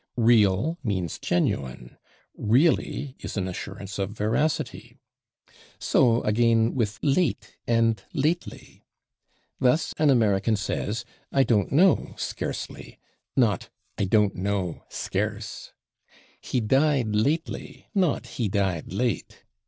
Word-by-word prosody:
/Real/ 115 - +3
means 95 -7 -2
genuine; 65 -7 -1 0.4
/really/ 135 +2 +1
is - - -5
an 95 -2 -1
assurance 100 +2 -6
of 95 -1 -1
veracity. 110 +9 -2 0.8
So, 120 -2 +3
again, 115 +1 +3
with 115 -4 -1
/late/ 140 - +1 0.2
and 115 -3 +2
/lately/. 155 +5 -2 0.8
Thus, 130 +5 +2
an 155 -1 +4
American 110 -4 +3
says 105 +2 -3 0.3
"I 135 - +4
don't 105 -6 +1
know, 175 +3 +3
/scarcely/," - - -5 0.4
not 110 -7 +2 0.3
"I - - 0
don't 105 0 +3
know, 95 -2 -2
/scarce/"; 105 0 -4 0.7
"he 125 - -1
died 135 +1 +2
/lately/," 140 +10 -1
not 180 - +1
"he 120 -2 -3
died 95 -5 -1
/late 115 +4 -3
110 Hz, 105 wpm, -26 LUFS, 100-130 Hz, 0.8 s, an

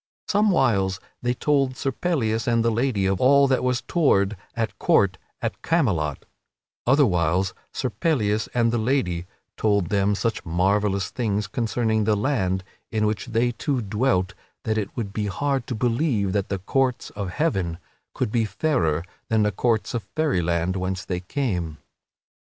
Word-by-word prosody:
Somewhiles 130 - +2 0.2
they 120 +1 0
told 135 -2 +1
Sir 135 - -1
Pellias 115 -8 -1
and 115 -1 +2
the 115 - +3
lady 115 -4 +1
of 95 -1 0
all 140 +2 +6
that 130 -1 +1
was 125 -1 +1
toward 110 - +2 0.2
at 110 -4 -2
court 95 -2 +3 0.2
at - - -3
Camelot; 90 - 0 0.6
otherwhiles 95 - +3 0.2
Sir 130 - -2
Pellias 110 - 0
and 115 -1 +3
the 120 - +1
lady 110 -8 0 0.3
told 100 -5 +1
them 100 0 +2
such 115 +1 -1
marvellous 95 +2 +1
things 105 -4 -1
concerning 110 0 0
the 110 0 +3
land 100 -6 0 0.3
in 110 -1 +1
which 105 +2 -1
they 120 +1 +1
two 130 +3 -1
dwelt 105 -3 0 0.3
that 110 - 0
it 105 -3 -1
would 100 -4 -3
be 105 -1 -1
hard 135 +6 -1
to 125 - -3
believe 115 -3 +1
that 100 -2 -1
the 100 - -1
courts 125 +6 0
of 100 -3 -4
Heaven 95 - -1 0.4
could - - -1
be 115 -1 +2
fairer 90 - 0 0.2
than 110 -1 +3
the 105 - +2
courts 115 +4 0
of 120 - -1
Fairyland 90 - +1
whence 95 0 -2
they 90 - -2
had 90 - -17
come. 90 - -2
110 Hz, 160 wpm, -24 LUFS, 95-125 Hz, 0.6 s, all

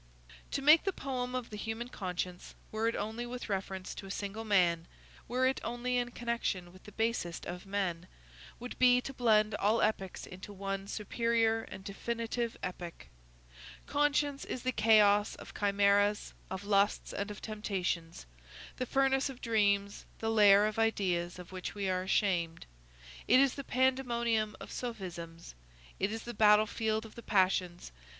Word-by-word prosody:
To 275 - -2
make 305 +3 +7
the 390 - 0
poem 255 -4 -3
of 250 -3 -4
the 210 - -6
human 225 +3 -4
conscience, 180 -4 -5 0.2
were 220 +1 0
it 230 - 0
only 220 +4 -3
with 245 -1 -6
reference 190 -1 -3
to 195 - -8
a - - -10
single 200 +2 -4
man, 175 -6 +2 0.4
were 255 +2 +1
it 260 +1 +1
only 240 +2 -1
in 245 0 0
connection 235 -7 -3
with 185 - -17
the 210 - -10
basest 220 -6 -2
of 180 +2 -7
men, 185 -3 -2 0.5
would 245 +1 -8
be 250 -1 +6
to 270 - -7
blend 215 -4 +3
all 210 +2 +2
epics 195 -4 -1
into 185 +3 -10
one 195 0 -4
superior 225 +1 +1
and 190 - -10
definitive 230 +3 -3
epic. 175 -2 -6 0.8
Conscience 290 -1 +1
is 250 - -5
the 255 - +1
chaos 210 -2 +4
of - - -11
chimæras, 205 0 +2 0.2
of 190 +1 -5
lusts, 200 0 +1
and 200 +1 -3
of 210 - -7
temptations; 185 - -3 0.5
the 255 - -2
furnace 270 +1 +2
of 260 -2 -9
dreams; 200 -3 +1
the 225 0 -1
lair 205 -2 +7
of 215 +1 -2
ideas 180 -6 0
of 180 0 -10
which 185 +1 -6
we 200 -1 -2
are 185 -1 +1
ashamed; 185 -3 0 0.6
it 255 - +6
is 275 -1 +4
the 275 - -6
pandemonium 235 -5 +1
of - - -9
sophisms; 175 -8 -6 0.5
it 195 +2 0
is 225 0 -4
the 240 - -6
battlefield 215 +1 +3
of 220 - -12
the 235 - -10
passions. 185 - +1
210 Hz, 160 wpm, -32 LUFS, 195-235 Hz, 0.8 s, make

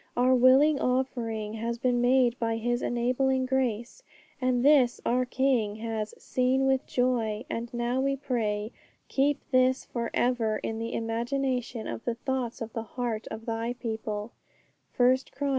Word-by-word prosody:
Our 250 +1 +4
willing 265 +4 +5
offering 235 -4 -1
has 230 +1 -3
been 245 -1 +1
made 245 -1 +3
by 225 -1 0
His 240 +2 -1
enabling 255 +2 +1
grace, 250 -3 -1 0.4
and 255 0 +1
this 275 -5 +5
our 250 +1 +2
King 250 -5 +1
has 220 -1 -4
'seen 260 +1 +1
with 265 -1 +1
joy.' 240 -3 0
And 230 0 -4
now 240 +2 -1
we 275 0 +1
pray, 220 -5 -2 0.4
'Keep 280 +1 0
this 255 0 +3
for 235 -1 -3
ever 235 -3 +1
in 220 +1 -4
the 230 +1 -4
imagination 240 +1 -2
of 115 -1 -5
the 235 - -1
thoughts 250 -1 -3
of 225 -1 -5
the 225 - -2 0.2
heart 235 -3 -2
of 225 - -7
Thy 230 +1 -2
people' 220 -2 -4 0.7
(1 250 +1 +5 0.2
Chron. 285 0 -2
245 Hz, 155 wpm, -28 LUFS, 225-260 Hz, 0.7 s, willing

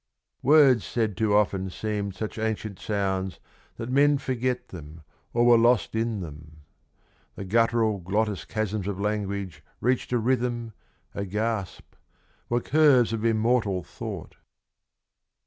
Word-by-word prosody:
Words 135 -4 +5
said 110 -4 -1
too 105 +2 +1
often 95 -2 +1
seemed 100 0 -3
such 110 0 -5
ancient 110 -2 -3
sounds 95 -3 -2 0.4
That 115 +2 -5
men 145 +2 +4
forget 130 -2 -2
them 80 -2 -10 0.3
or 120 0 +2
were 120 -1 +7
lost 120 -1 +3
in 110 -2 -1
them; 75 -1 -11 0.7
The 100 - -6
guttural 115 0 +2
glottis 100 +3 -1
chasms 105 -2 -3
of 100 -2 -3
language 100 -6 -3 0.2
reached 125 +1 0
A 125 - +2
rhythm, 120 -1 -1 0.4
a 100 - -3
gasp, 105 0 -3 0.6
were 120 0 +1
curves 140 -6 +4
of 110 -1 -3
immortal 110 -4 +1
thought. - - -8
110 Hz, 130 wpm, -26 LUFS, 100-120 Hz, 0.7 s, were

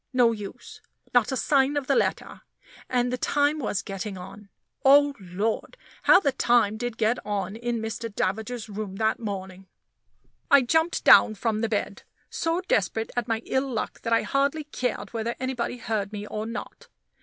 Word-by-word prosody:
No 245 -2 +5
use; 210 -3 -8 0.3
not 245 -1 +3
a 265 - -1
sign 280 +1 +2
of 275 -2 -2
a 275 - +3
letter; - - -1 0.5
and 245 0 +1
the 250 - -2
time 290 +1 +1
was 210 -6 -2
getting 195 0 -5
on 195 +3 -11 0.3
oh, 285 +1 +6
Lord! 200 - -3 0.2
how 375 - +7
the 285 -7 +1
time 235 -4 +2
did 245 0 -4
get 225 +3 +1
on 205 -1 -3
in 240 +1 -2
Mr. 225 +1 -4
Davager's 220 +4 -2
room 205 -2 -6
that 220 +2 0
morning. 190 -3 -6 0.8
I 280 -2 +7
jumped 320 +7 +1
down 215 - +7
from 215 +1 -1
the 225 - 0
bed, 205 -2 -2 0.3
so 330 +2 -1
desperate 225 - 0
at 245 -1 -1
my 225 -1 -1
ill 265 0 -1
luck 220 -3 -4
that 230 - -4
I 230 - +3
hardly 280 +3 0
cared 255 -5 -4
whether 230 +1 -2
anybody 255 -1 -2
heard 215 -3 -2
me 210 -1 -6
or 215 +1 -4
not. 230 +1 -7
230 Hz, 175 wpm, -26 LUFS, 210-260 Hz, 0.8 s, how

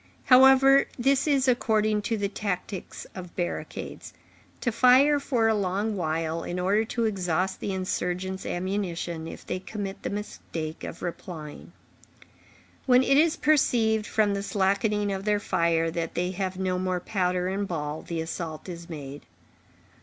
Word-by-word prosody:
However, 270 +1 +7
this 270 +3 +2
is 275 -3 +2
according 215 -4 +2
to 225 - +1
the 200 -1 0
tactics 195 -2 -5
of 180 -2 -9
barricades; 175 -1 -5 0.5
to 240 - 0
fire 260 +5 +5
for 245 -5 +1
a 220 - +4
long 205 +1 -1
while, 165 -1 -2
in 175 +1 -4
order 200 +4 +2
to 230 +1 -1
exhaust 185 -3 -1
the 200 - -3
insurgents' 185 0 -2
ammunition, 175 -3 -3
if - - -9
they 185 - -3
commit 195 0 -6
the - - -3
mistake 165 -6 -6
of - - -7
replying. 165 -3 -7 1.2
When 250 0 +6
it 275 - +3
is 320 +2 +4
perceived, 225 -8 +2
from 210 -2 +2
the 200 - -2
slackening 200 +1 +1
of 195 0 -3
their 210 0 +1
fire, 165 -4 +1
that 165 0 -3
they 180 +1 0
have 185 0 -3
no 185 -1 -1
more 185 -1 -1
powder 180 -1 -1
and 195 +2 -2
ball, 150 -3 -3
the 165 -1 -4
assault 160 0 -5
is 170 -1 -8
made. 145 -3 -8
190 Hz, 155 wpm, -26 LUFS, 175-220 Hz, 1.2 s, However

